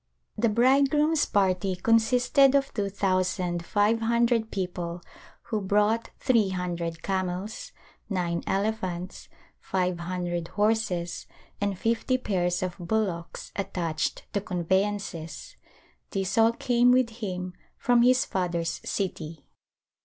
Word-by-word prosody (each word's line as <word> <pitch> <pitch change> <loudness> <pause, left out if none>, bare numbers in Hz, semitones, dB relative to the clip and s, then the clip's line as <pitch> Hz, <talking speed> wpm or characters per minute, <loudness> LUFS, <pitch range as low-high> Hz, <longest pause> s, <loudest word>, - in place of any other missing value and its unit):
The 230 +1 +2
bridegroom's 280 +6 +3
party 190 -1 +1
consisted 245 +7 +4
of 275 -1 +1
two 200 -2 -1
thousand 185 -3 0
five 210 +5 +2
hundred 235 0 +2
people 180 -3 -4 0.4
who 215 -2 -2
brought 210 +3 +1
three 230 -7 +3
hundred 175 -3 -3
camels, 190 +2 -3 0.4
nine 175 -4 -1
elephants, 190 -3 -2 0.3
five 180 -2 -1
hundred 175 -1 -3
horses 205 -5 0 0.3
and 200 -2 0
fifty 230 +5 +1
pairs 180 -7 -1
of 185 -1 -3
bullocks 175 -2 -2
attached 175 -5 -2
to 200 - 0
conveyances. 190 -2 -2 0.5
These 195 -1 -2
all 225 0 +5
came 245 +1 +3
with 250 -2 +3
him 180 -3 -4 0.2
from 245 -1 +3
his 255 +1 +4
father's 170 -3 -2
city. 165 -5 -4
195 Hz, 110 wpm, -27 LUFS, 180-225 Hz, 0.5 s, all